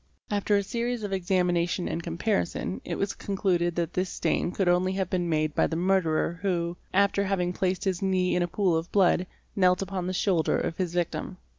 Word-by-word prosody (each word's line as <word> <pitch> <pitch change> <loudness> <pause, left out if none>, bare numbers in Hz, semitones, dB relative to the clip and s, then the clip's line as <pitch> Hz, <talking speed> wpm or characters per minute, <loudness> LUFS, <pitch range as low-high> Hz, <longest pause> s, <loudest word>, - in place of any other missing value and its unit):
After 205 0 +2
a 200 - +1
series 235 +2 -2
of 200 -1 -3
examination 180 -1 +1
and 170 - -2
comparison 175 +2 -2
it - - -4
was 200 - -1
concluded 180 -4 0
that 170 -2 -1
this 185 0 -1
stain - - 0
could 190 0 -1
only 180 +1 +3
have 190 -2 -2
been 175 -2 0
made 155 -1 +1
by - - +2
the 160 - -3
murderer 170 -2 +1
who, 175 -3 -1 0.2
after 200 +1 +3
having 180 -2 0
placed 185 0 -1
his 190 -3 -1
knee 185 -1 +1
in 180 - +2
a 175 - +1
pool 180 -1 +1
of 165 +2 -2
blood, 185 -2 +3 0.3
knelt 180 -1 +3
upon 190 -2 -4
the 185 - -2
shoulder 180 -3 +2
of 165 - -2
his 180 -3 -1
victim. 175 +1 -2
180 Hz, 200 wpm, -27 LUFS, 175-195 Hz, 0.3 s, only